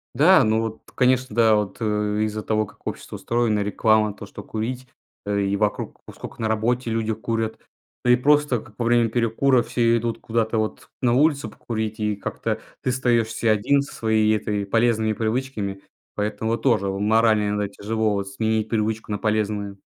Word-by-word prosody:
Да, 165 +6 +6
ну 110 +1 +2
вот, 110 -1 -5
конечно, 125 -3 +2
да, 115 -2 +5
вот, 105 -2 -1
э, 105 -1 0
из-за 110 0 -2
того, 110 0 0
как - - -15
общество - - -6
устроено, 115 -3 0
реклама 105 +1 +2
то, 105 - -10
что 100 0 -10
курить, 125 +5 -4 0.4
э, 100 0 0
и 100 0 0
вокруг 105 -1 -2
Вот - - -11
сколько - - -9
на 110 - 0
работе 115 +3 0
люди 110 -1 -1
курят. 110 +1 -3 0.5
Да 125 - +5
и - - +7
просто, 145 -2 +2
как 110 -2 -17
во 120 - 0
время 120 -1 +3
перекура 120 +2 +2
все 115 -1 +2
идут 115 0 -3
куда-то, 115 0 0
вот, 110 0 -3
на 125 -2 +3
улицу 140 -3 +2
покурить, 110 -1 -4
и 105 -1 0
как-то 100 - -4 0.2
ты 130 - 0
остаёшься 115 -3 +1
1 110 +7 +2
со 140 - -8
своей 110 -1 +2
этой 105 -1 -2
полезными 110 +1 +2
привычками. 110 -3 -2 0.3
Поэтому 105 +1 -2
вот 115 - -1
тоже 110 -7 +2
морально 105 +1 +2
иногда 105 0 -1
тяжело, 110 +2 -1
вот, 100 -1 -3
сменить 110 +2 -1
привычку 110 -1 -1
на 105 - 0
полезную. 105 -1 -1
110 Hz, 180 wpm, -23 LUFS, 105-120 Hz, 0.5 s, и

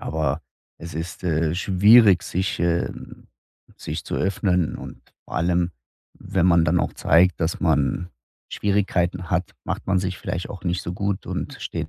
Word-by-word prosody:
aber 75 -1 -1 0.4
es 85 -2 -8
ist, 80 +3 -6
äh, 80 -1 +1
schwierig, 100 0 +6
sich, 95 +2 -2
ähm 85 0 -2 0.5
sich - - -5
zu - - -4
öffnen. 90 -3 0
Und - - -10 0.2
vor - - -11
allem, 85 +1 +1 0.4
wenn 95 -2 0
man 85 -2 +5
dann 85 +3 +2
auch - - -1
zeigt, 85 +3 +3
dass 80 +1 -1
man 90 0 +1 0.4
Schwierigkeiten 95 -3 0
hat, 90 -2 -1
macht - - -4
man 95 -1 +3
sich 95 0 -2
vielleicht 90 - -4
auch 95 - -8
nicht 90 -1 -1
so 85 - -4
gut 100 +1 -3
und - - -4
steht - - -4
90 Hz, 160 wpm, -23 LUFS, 85-95 Hz, 0.5 s, schwierig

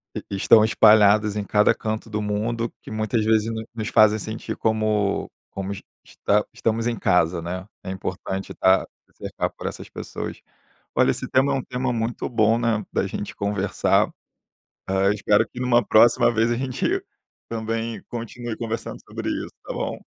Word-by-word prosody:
e 100 - -5
estão 110 +3 +6
espalhadas 105 -1 +5
em 105 - -1
cada 105 +1 +3
canto 110 +1 -4
do 105 -1 -3
mundo, 110 +3 -2
que - - -10
muitas 110 0 0
vezes 110 0 +2
no 110 0 -5
nos 110 -2 -4
fazem 110 0 +5
sentir 110 +2 -5
como 110 -2 0 0.2
como 95 0 -5
es 100 - -6 0.2
esta 105 +1 0
estamos 115 +1 -1
em 120 - 0
casa, 90 -3 +2
né. 90 +3 -5 0.2
É - - -6
importante 95 0 -4
estar 95 0 +3 0.3
cercado - - -3
por - - -5
essas - - -6
pessoas. - - -6 0.6
Olha, - - +4
esse - - -4
tema 135 +2 +3
é - - +1
um 135 - -2
tema 125 0 -2
muito 115 +1 -2
bom, 110 0 +3
né, 115 -3 0
da 95 - +1
gente 105 - -6
conversar. 100 -1 +1 0.8
Hã, 95 +1 +2
espero 105 +1 +2
que 125 - -11
numa 120 -2 +3
próxima 120 +2 +5
vez, 115 +1 +2
a 120 - +1
gente 130 0 -1 0.5
também 115 0 -3
continue 120 0 -6
conversando 115 0 -4
sobre - - -5
isso, - - -4
tá - - -5
bom? - - -4
110 Hz, 170 wpm, -23 LUFS, 105-115 Hz, 0.8 s, estão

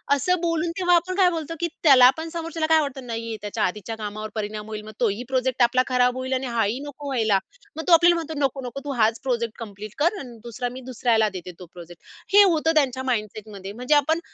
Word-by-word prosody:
असं 360 +6 +1
बोलून 335 -1 0
तेव्हा 355 -1 +4
आपण 360 +2 0
काय 375 -2 +5
बोलतो 330 -2 -4
की 345 - 0 0.2
त्याला 260 -5 +8
पण 320 +1 -5
समोरच्याला 330 -1 -3
काय 315 - +6
वाटतं 275 -3 -5
नाही 230 0 -4
आहे 225 -1 -4
त्याच्या 205 -1 -3
आधीच्या 210 +4 -3
कामावर 215 0 -6
परिणाम 210 0 -4
होईल 215 -1 -6
मग 215 - -9
तोही 230 -1 0
प्रोजेक्ट 260 -1 +1
आपला 255 +1 +3
खराब 250 -1 +2
होईल 260 +1 -3
आणि 260 0 -1
हाही 230 0 0
नको 290 0 -8
व्हायला. 220 -7 +2 0.4
मग 320 - -5
तो 355 - +5
आपल्याला 345 +1 +6
म्हणतो 325 -2 -4
नको 270 0 -3
नको 245 +3 -6
तू 285 - -3
हाच 225 +1 +2
प्रोजेक्ट 235 -4 -2
कंप्लीट 210 -2 -9
कर 340 +7 +2
अन 245 -7 -10
दुसरा 240 +1 -4
मी 260 - -8
दुसऱ्याला 225 -3 +2
देते 185 -2 -8
तो 180 - -9
प्रोजेक्ट 175 -1 -12 0.3
हे 410 0 +9
होतं 325 -4 +2
त्यांच्या 260 -4 +1
माइंडसेटमध्ये 215 -5 -4
म्हणजे 250 +6 +1
आपण 315 +3 +2
255 Hz, 220 wpm, -24 LUFS, 215-315 Hz, 0.4 s, हे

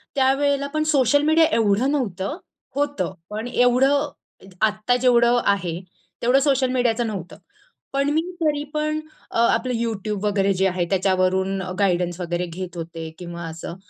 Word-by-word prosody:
त्यावेळेला 280 +1 +2
पण 310 0 +1
social 285 -3 +3
media 315 +2 +5
एवढं 225 +4 +2
नव्हतं, 215 - -2 0.4
होतं 285 -6 -1 0.2
पण 215 +3 -4
एवढं 245 +2 +3 0.5
अ - - -15 0.2
आत्ता 215 +3 +1
जेवढं 245 -1 +4
आहे 175 -4 0 0.4
तेवढं 250 +3 +4
सोशल 270 -2 +2
मीडियाचं 240 -2 +1
नव्हतं. 190 -5 -6 0.6
पण 275 +1 +1
मी 315 - +2 0.2
तरी 295 -2 +1
पण 305 0 -1 0.3
अ, - - -3
आपलं 250 +2 +2
YouTube 215 -3 -2
वगैरे 200 -1 +2
जे 190 +1 +2
आहे 180 -1 -1
त्याच्यावरून 190 0 +1 0.2
गाईडन्स 180 -3 +1
वगैरे 175 0 -2
घेत 175 +1 -7
होते 165 -1 -6
किंवा 170 -1 -7
असं 165 +1 -7
225 Hz, 145 wpm, -22 LUFS, 185-270 Hz, 0.6 s, media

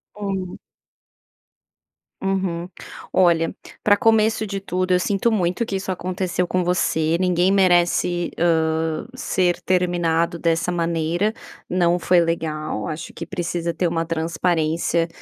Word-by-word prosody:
Hum. 195 -3 -4 1.6
Uhum. 185 -3 -1 0.5
Olha, 170 -1 +3 0.3
pra 205 -1 +5
começo 220 0 +2
de 195 0 -3
tudo, 185 -1 -2
eu 180 - +4
sinto 200 +5 +1
muito 180 +1 0
que 195 - -3
isso 190 0 -3
aconteceu 180 0 -2
com 185 -1 0
você, 165 -2 +1
ninguém 180 0 +2
merece, 175 -2 +2
hã, 160 0 +1
ser 180 -7 0
terminado 175 -2 +1
dessa 165 +1 +1
maneira, 170 +4 0 0.4
não 175 -1 +2
foi 180 0 +3
legal, 155 -9 -2
acho 155 +2 -6
que - - -7
precisa 170 -2 -3
ter 170 +2 -1
uma 165 0 -1
transparência, 165 0 0
175 Hz, 120 wpm, -22 LUFS, 165-185 Hz, 1.6 s, pra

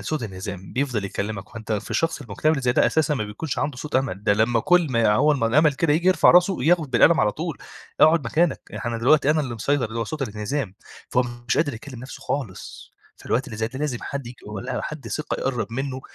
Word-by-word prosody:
صوت 155 -4 -3
انهزام، 95 -2 -7
بيفضل 125 -6 -1
يكلمك، 100 +1 -5
وأنت 115 -1 -5
في 105 0 -3
الشخص 165 -2 0
المكتئب 130 +5 0
اللي 140 -4 -2
زي 125 -1 +2
ده - - +4
أساسًا 155 -1 +1
ما 110 - -2
بيكونش 115 +8 -5
عنده 145 -3 -2
صوت 150 -1 -2
أمل، 110 -7 -2
ده 105 - +4
لمّا 115 +2 +2
كُلّ 180 +6 +4
ما 115 -3 +3
هو 150 +7 +4
أما 130 -6 +1
الأمل 150 +6 +4
كده 145 +2 +1
ييجي 170 +4 +2
يرفع 185 - +6
راسه 180 -5 +4
ياخد 160 -3 +3
بالقلم 145 +7 +5
على 105 -1 +2
طول، 165 -1 -5 0.4
اقعد 155 -2 +5
مكانك، 165 +7 +1
يعني - - -7
أنا 115 -1 -2
دلوقتي 140 +5 +4
أنا 155 0 +2
اللي 130 -5 -4
مسيطر، 140 +5 0
اللي 115 +1 -5
هو 115 - 0
صوت 150 +6 -4
الانهزام، 105 -1 -3 0.4
فهو 125 - +3 0.3
مش - - +2
قادر 150 -3 +1
يكلم 120 +2 -9
نَفسه 130 - -9
خالص، 130 -10 -5 0.2
فالوقت 130 +4 -1
اللي 110 -5 -7
زي 110 0 -1
ده 130 +2 -8
لازم 145 -5 -2
حد 140 -3 -5
ييجي 120 +1 -10
ولا 105 -2 -4
حد 150 -2 -6
ثقة 155 - -3
يقرّب 120 -5 -2
منه 135 +1 -3
130 Hz, 230 wpm, -23 LUFS, 110-150 Hz, 0.4 s, يرفع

